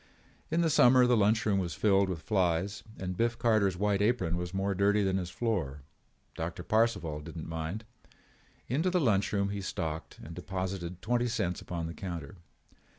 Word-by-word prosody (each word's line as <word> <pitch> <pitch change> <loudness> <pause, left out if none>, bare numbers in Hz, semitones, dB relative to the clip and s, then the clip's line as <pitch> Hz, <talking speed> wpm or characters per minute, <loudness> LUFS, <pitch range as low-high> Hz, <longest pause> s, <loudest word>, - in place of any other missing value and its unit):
In 165 +2 +1
the 165 - +3
summer 125 -2 +6
the 125 0 +4
lunch 110 +1 +3
room 100 -2 +2
was 85 -5 -3
filled 100 -2 +3
with 80 -4 -4
flies 95 0 0 0.2
and 90 -1 -4
Biff 115 +4 0
Carter's 110 -6 +2
white 100 0 +1
apron 105 -6 +1
was 90 0 -3
more 95 +1 0
dirty 100 +2 +3
than 95 -1 +1
his 90 -2 -3
floor. 90 - -2 0.5
Doctor 85 +2 -5
Parcival 110 -8 +1
did 75 - -9
not 80 - -5
mind. 80 +7 -4 0.8
Into 155 +9 +1
the 180 0 +2
lunch 105 - +2
room 100 -1 +1
he 100 0 -3
stalked 80 -4 -4
and 85 - -8
deposited 90 0 -4
twenty 120 +2 +1
cents 105 -7 -1
upon 85 -2 -4
the 85 - -5
counter. 85 -3 -6
95 Hz, 180 wpm, -30 LUFS, 85-110 Hz, 0.8 s, summer